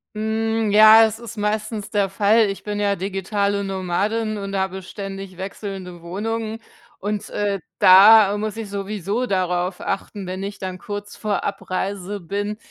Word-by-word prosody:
Hm, 220 Hz, 0 st, 0 dB
ja, 215 Hz, +2 st, +9 dB
es 220 Hz, 0 st, -3 dB
ist 230 Hz, -1 st, -9 dB
meistens 210 Hz, 0 st, -2 dB
der 200 Hz, -2 st, +1 dB
Fall. 210 Hz, +2 st, +3 dB
Ich 195 Hz, -, -6 dB
bin 205 Hz, 0 st, -3 dB
ja 200 Hz, -1 st, +1 dB
digitale 200 Hz, +1 st, -1 dB
Nomadin 200 Hz, +4 st, -1 dB
und 200 Hz, -1 st, -5 dB
habe 190 Hz, 0 st, -2 dB
ständig 195 Hz, -1 st, -8 dB
wechselnde 190 Hz, -2 st, -7 dB
Wohnungen 220 Hz, +5 st, -4 dB, 0.4 s
und, 205 Hz, 0 st, -3 dB
äh, 205 Hz, -1 st, -1 dB, 0.2 s
da 200 Hz, +2 st, +8 dB
muss 215 Hz, +1 st, -4 dB
ich 220 Hz, -2 st, -5 dB
sowieso 200 Hz, +3 st, -3 dB
darauf 180 Hz, -2 st, -1 dB
achten, 195 Hz, 0 st, -4 dB
wenn 185 Hz, +1 st, -5 dB
ich 200 Hz, +1 st, -5 dB
dann 185 Hz, -1 st, -6 dB
kurz 205 Hz, +1 st, -7 dB
vor 210 Hz, -2 st, -2 dB
Abreise 195 Hz, 0 st, -3 dB
bin, 205 Hz, +4 st, -3 dB
200 Hz, 150 wpm, -22 LUFS, 195-215 Hz, 0.4 s, ja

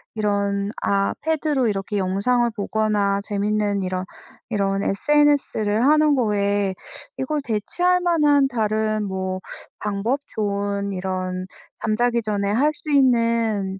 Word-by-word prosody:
이런 200 Hz, -1 st, 0 dB
아 200 Hz, 0 st, +1 dB
패드로 300 Hz, -5 st, 0 dB
이렇게 205 Hz, 0 st, -2 dB
영상을 205 Hz, +6 st, +1 dB
보거나 205 Hz, -1 st, 0 dB
재밌는 205 Hz, -1 st, 0 dB
이런 185 Hz, 0 st, -3 dB, 0.4 s
이런 195 Hz, -2 st, 0 dB
SNS를 260 Hz, -4 st, +2 dB
하는 305 Hz, 0 st, +4 dB
거에 205 Hz, -4 st, +1 dB, 0.4 s
이걸 290 Hz, +3 st, -2 dB
대체할 350 Hz, -, +1 dB
만한 295 Hz, -5 st, +3 dB
다른 215 Hz, -3 st, 0 dB
뭐 190 Hz, -1 st, -3 dB, 0.4 s
방법 210 Hz, +7 st, -1 dB
좋은 200 Hz, -1 st, -2 dB
이런 185 Hz, 0 st, -3 dB, 0.3 s
잠자기 235 Hz, +2 st, +1 dB
전에 200 Hz, -2 st, -1 dB
할 270 Hz, +9 st, +2 dB
수 300 Hz, 0 st, -7 dB
있는 230 Hz, -7 st, +2 dB
210 Hz, 240 characters per minute, -22 LUFS, 200-250 Hz, 0.4 s, 하는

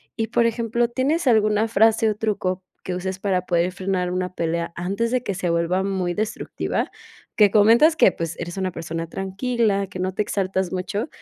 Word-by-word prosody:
Y, 225 Hz, 0 st, -1 dB
por 235 Hz, 0 st, +3 dB
ejemplo, 235 Hz, +1 st, 0 dB
¿tienes 275 Hz, +6 st, 0 dB
alguna 215 Hz, -1 st, +3 dB
frase, 225 Hz, 0 st, +3 dB
o 210 Hz, -, -1 dB
truco 195 Hz, -4 st, -2 dB, 0.2 s
que 180 Hz, -, -3 dB
uses 190 Hz, +1 st, -4 dB
para 190 Hz, -3 st, 0 dB
poder 175 Hz, +1 st, +1 dB
frenar 185 Hz, -1 st, -1 dB
una 185 Hz, 0 st, -2 dB
pelea 170 Hz, 0 st, -2 dB
antes 200 Hz, +7 st, -2 dB
de 255 Hz, -1 st, +1 dB
que 200 Hz, -6 st, -3 dB
se 180 Hz, -2 st, -1 dB
vuelva 170 Hz, +3 st, +1 dB
muy 185 Hz, -3 st, -1 dB
destructiva? 215 Hz, +1 st, -2 dB, 0.5 s
Que 205 Hz, -2 st, +5 dB
comentas 230 Hz, +10 st, +6 dB
que, 195 Hz, -, +5 dB
pues, 165 Hz, -2 st, -4 dB
eres 175 Hz, +2 st, -5 dB
una 185 Hz, -1 st, -1 dB
persona 165 Hz, 0 st, -5 dB
tranquila, 200 Hz, +2 st, -1 dB
que 185 Hz, -1 st, -9 dB
no 185 Hz, +1 st, -1 dB
te 210 Hz, -, +1 dB
exaltas 190 Hz, -2 st, -1 dB
mucho, 195 Hz, -, -3 dB
195 Hz, 185 wpm, -23 LUFS, 180-225 Hz, 0.5 s, comentas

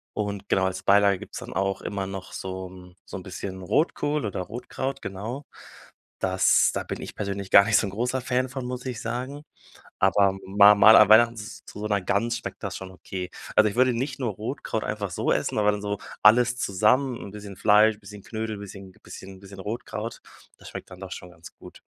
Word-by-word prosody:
Und 100 Hz, -2 st, -3 dB
genau, 95 Hz, 0 st, +2 dB
als 95 Hz, 0 st, -3 dB
Beilage 100 Hz, 0 st, +4 dB
gibt's -, -, -8 dB
dann -, -, -9 dB
auch 95 Hz, 0 st, -1 dB
immer 100 Hz, -1 st, -3 dB
noch 95 Hz, -1 st, -7 dB
so 95 Hz, 0 st, -5 dB
'n 90 Hz, -1 st, -14 dB
so -, -, -7 dB
'n 95 Hz, -, -9 dB
bisschen 95 Hz, 0 st, -7 dB
Rotkohl 150 Hz, -, 0 dB
oder 100 Hz, -3 st, -3 dB
Rotkraut, 125 Hz, +6 st, -5 dB
genau. 110 Hz, +9 st, -6 dB, 0.7 s
Das 95 Hz, 0 st, +3 dB
da -, -, -2 dB
bin -, -, -6 dB
ich -, -, -8 dB
persönlich 100 Hz, -1 st, -4 dB
gar 100 Hz, -, +8 dB
nicht 110 Hz, -1 st, +4 dB
so 105 Hz, -, +1 dB
'n -, -, -6 dB
großer 125 Hz, +5 st, -1 dB
Fan 130 Hz, 0 st, 0 dB
von, 130 Hz, -1 st, -5 dB
muss 125 Hz, 0 st, -5 dB
ich 125 Hz, -4 st, -4 dB
sagen, 125 Hz, +5 st, -4 dB, 0.6 s
aber 95 Hz, 0 st, +3 dB
mal 100 Hz, +2 st, +7 dB
mal 110 Hz, +2 st, +8 dB
an 105 Hz, -, +7 dB
Weihnachten 115 Hz, +2 st, +6 dB
z 110 Hz, +1 st, -9 dB
zu 105 Hz, -, -9 dB
so 105 Hz, -, -3 dB
'ner 100 Hz, -1 st, +1 dB
Gans 115 Hz, +5 st, 0 dB
schmeckt -, -, -8 dB
das -, -, -4 dB
schon 95 Hz, 0 st, -8 dB
okay. 90 Hz, 0 st, -6 dB, 0.3 s
Also, 110 Hz, 0 st, +6 dB
ich 100 Hz, -, -9 dB
würde 130 Hz, 0 st, +4 dB
nicht 130 Hz, +2 st, -3 dB
nur 120 Hz, -4 st, -1 dB
Rotkraut 110 Hz, +1 st, -4 dB
einfach 105 Hz, -2 st, -3 dB
so -, -, -1 dB
essen, -, -, -1 dB
aber 105 Hz, 0 st, +4 dB
dann 105 Hz, 0 st, -4 dB
so 105 Hz, -1 st, -3 dB, 0.2 s
alles 120 Hz, +3 st, +5 dB
zusammen, 115 Hz, +6 st, +2 dB
'n 100 Hz, -, -8 dB
bisschen 105 Hz, -2 st, -9 dB
Fleisch, 105 Hz, +1 st, +4 dB
bisschen 105 Hz, 0 st, -11 dB
Knödel, 110 Hz, 0 st, -4 dB
bisschen 100 Hz, -1 st, -10 dB
bisschen 95 Hz, 0 st, -11 dB
bisschen 100 Hz, -1 st, -11 dB
Rotkraut, 110 Hz, +1 st, -5 dB, 0.4 s
das -, -, -12 dB
schmeckt -, -, -9 dB
dann 90 Hz, -, -12 dB
doch 95 Hz, -2 st, -8 dB
schon 90 Hz, -, -8 dB
ganz 85 Hz, -1 st, -14 dB
gut. -, -, -14 dB
105 Hz, 210 wpm, -25 LUFS, 95-115 Hz, 0.7 s, gar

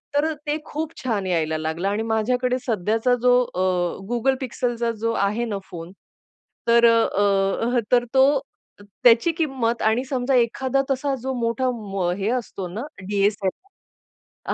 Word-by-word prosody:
तर 310 Hz, +2 st, +2 dB
ते 295 Hz, +1 st, 0 dB
खूप 315 Hz, +2 st, -4 dB
छान 215 Hz, -6 st, -1 dB
यायला 160 Hz, -3 st, 0 dB
लागलं 160 Hz, +4 st, -2 dB
आणि 210 Hz, +2 st, -1 dB
माझ्याकडे 250 Hz, +3 st, +1 dB
सध्याचा 225 Hz, +4 st, +1 dB
जो 250 Hz, 0 st, +5 dB, 0.2 s
अ, 185 Hz, -, 0 dB, 0.5 s
Google 265 Hz, +3 st, +1 dB
पिक्सलचा 240 Hz, -2 st, -1 dB
जो 230 Hz, 0 st, 0 dB
आहे 230 Hz, +4 st, -1 dB
ना 205 Hz, -3 st, -3 dB
फोन, 170 Hz, 0 st, -8 dB, 0.8 s
तर 235 Hz, 0 st, +5 dB
अ, 205 Hz, -1 st, +2 dB
अ, -, -, +5 dB
तर 245 Hz, -1 st, +4 dB
तो 265 Hz, +2 st, +6 dB, 0.7 s
त्याची 240 Hz, +7 st, +6 dB
किंमत 260 Hz, -7 st, -1 dB
आणि 220 Hz, +4 st, +2 dB
समजा 260 Hz, 0 st, 0 dB
एखादा 260 Hz, +3 st, +1 dB
तसा 270 Hz, +1 st, 0 dB
जो 265 Hz, +1 st, -3 dB
मोठा 235 Hz, +2 st, 0 dB, 0.3 s
व 180 Hz, -3 st, 0 dB
हे 200 Hz, +2 st, -1 dB
असतो 215 Hz, -7 st, -3 dB
ना 205 Hz, +7 st, -6 dB, 0.3 s
डी-एस-एल-आर 205 Hz, -, -4 dB
235 Hz, 145 wpm, -23 LUFS, 205-255 Hz, 0.8 s, तो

